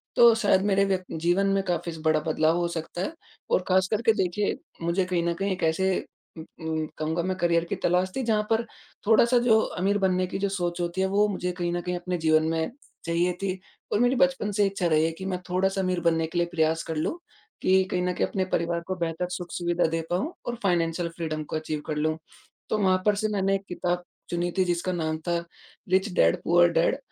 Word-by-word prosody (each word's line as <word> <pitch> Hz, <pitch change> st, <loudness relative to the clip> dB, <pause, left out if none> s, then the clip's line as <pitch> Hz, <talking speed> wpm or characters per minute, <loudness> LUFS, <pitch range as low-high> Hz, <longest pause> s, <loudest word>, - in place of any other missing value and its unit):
तो 235 Hz, -1 st, +8 dB
शायद 205 Hz, -4 st, +3 dB
मेरे 200 Hz, -1 st, +3 dB
व्यक्ति 185 Hz, -3 st, -2 dB
जीवन 175 Hz, +4 st, +2 dB
में 195 Hz, 0 st, +1 dB
काफ़ी 175 Hz, -1 st, -1 dB
बड़ा 155 Hz, -1 st, +4 dB
बदलाव 155 Hz, +1 st, +2 dB
हो 175 Hz, 0 st, +1 dB
सकता 170 Hz, +1 st, -5 dB
है 245 Hz, -, -2 dB, 0.4 s
और 185 Hz, -, +3 dB
खास 185 Hz, 0 st, +3 dB
करके 225 Hz, +1 st, +3 dB
देखिए 185 Hz, +3 st, -1 dB, 0.3 s
मुझे 170 Hz, +3 st, +1 dB
कहीं 180 Hz, -2 st, 0 dB
न 170 Hz, -, +1 dB
कहीं 195 Hz, +3 st, -2 dB
एक 180 Hz, -, -6 dB
ऐसे 175 Hz, +4 st, +2 dB, 0.5 s
उम 160 Hz, -, -7 dB, 0.2 s
उम, 160 Hz, -1 st, -1 dB
कहूँगा 160 Hz, +2 st, -1 dB
मैं 185 Hz, +1 st, -2 dB
करियर 170 Hz, -2 st, +2 dB
की -, -, -3 dB
तलाश 180 Hz, +2 st, +2 dB
थी 265 Hz, -, -1 dB
जहाँ 220 Hz, -2 st, +1 dB
पर 225 Hz, +1 st, +2 dB, 0.4 s
थोड़ा 220 Hz, 0 st, +6 dB
सा 245 Hz, +1 st, +3 dB
जो 220 Hz, -2 st, +6 dB, 0.2 s
अमीर 200 Hz, +3 st, +2 dB
बनने 185 Hz, -2 st, +1 dB
की -, -, -4 dB
जो 200 Hz, 0 st, 0 dB
सोच 175 Hz, -2 st, -2 dB
होती 175 Hz, +2 st, -2 dB
है 190 Hz, -, +2 dB
वो 205 Hz, +2 st, +3 dB
मुझे 180 Hz, -3 st, -2 dB
कहीं 175 Hz, -1 st, -2 dB
न 175 Hz, -, -1 dB
कहीं 180 Hz, +1 st, -3 dB
अपने 180 Hz, 0 st, -3 dB
जीवन 155 Hz, -1 st, +3 dB
में 160 Hz, +3 st, -1 dB, 0.3 s
चाहिए 170 Hz, +2 st, +1 dB
थी 190 Hz, -1 st, -2 dB, 0.3 s
और -, -, +2 dB
मेरी 245 Hz, +2 st, +3 dB
बचपन 265 Hz, -5 st, +2 dB
से 205 Hz, 0 st, +2 dB
इच्छा 195 Hz, -2 st, -2 dB
रही 155 Hz, -1 st, +3 dB
है 165 Hz, -, 0 dB
कि 185 Hz, +4 st, -8 dB
मैं 185 Hz, -1 st, -2 dB
थोड़ा-सा 190 Hz, +2 st, +1 dB
अमीर 185 Hz, -1 st, 0 dB
बनने 165 Hz, -1 st, +2 dB
के 165 Hz, -, -5 dB
लिए 175 Hz, 0 st, +2 dB
प्रयास 160 Hz, -1 st, +1 dB
कर 160 Hz, -, -4 dB
लूँ 155 Hz, -, -1 dB, 0.4 s
कि 190 Hz, 0 st, +4 dB
कहीं 180 Hz, -, 0 dB
न 180 Hz, 0 st, 0 dB
कहीं -, -, 0 dB
अपने 190 Hz, -2 st, -1 dB
परिवार 170 Hz, 0 st, 0 dB
को 185 Hz, -, -2 dB
बेहतर 170 Hz, 0 st, -2 dB
सुख 175 Hz, -1 st, -6 dB
सुविधा 175 Hz, 0 st, 0 dB
दे 165 Hz, 0 st, -1 dB
पाऊँ 255 Hz, -, -1 dB
और 240 Hz, -, -2 dB
फ़ायनैन्शल 170 Hz, -2 st, +1 dB
फ्रीडम 155 Hz, -2 st, -3 dB
को 150 Hz, -, -6 dB
अचीव 155 Hz, -1 st, -3 dB
कर 155 Hz, -, -2 dB
लूँ। 155 Hz, +1 st, 0 dB, 0.5 s
तो 215 Hz, -, +1 dB
वहाँ 185 Hz, -2 st, +2 dB
पर 210 Hz, -1 st, +4 dB
से 215 Hz, +2 st, 0 dB
मैंने 195 Hz, -1 st, +1 dB
एक 195 Hz, -, -4 dB
किताब 180 Hz, 0 st, -2 dB, 0.3 s
चुनी 175 Hz, 0 st, -1 dB
थी 185 Hz, -, +3 dB
जिसका 175 Hz, +1 st, -1 dB
नाम 160 Hz, -2 st, -1 dB
था 170 Hz, 0 st, +2 dB, 0.5 s
रिच 190 Hz, +3 st, +2 dB
डैड 85 Hz, -, +3 dB
पूअर 175 Hz, 0 st, +5 dB
डैड। 170 Hz, +9 st, +2 dB
180 Hz, 230 wpm, -26 LUFS, 170-195 Hz, 0.5 s, तो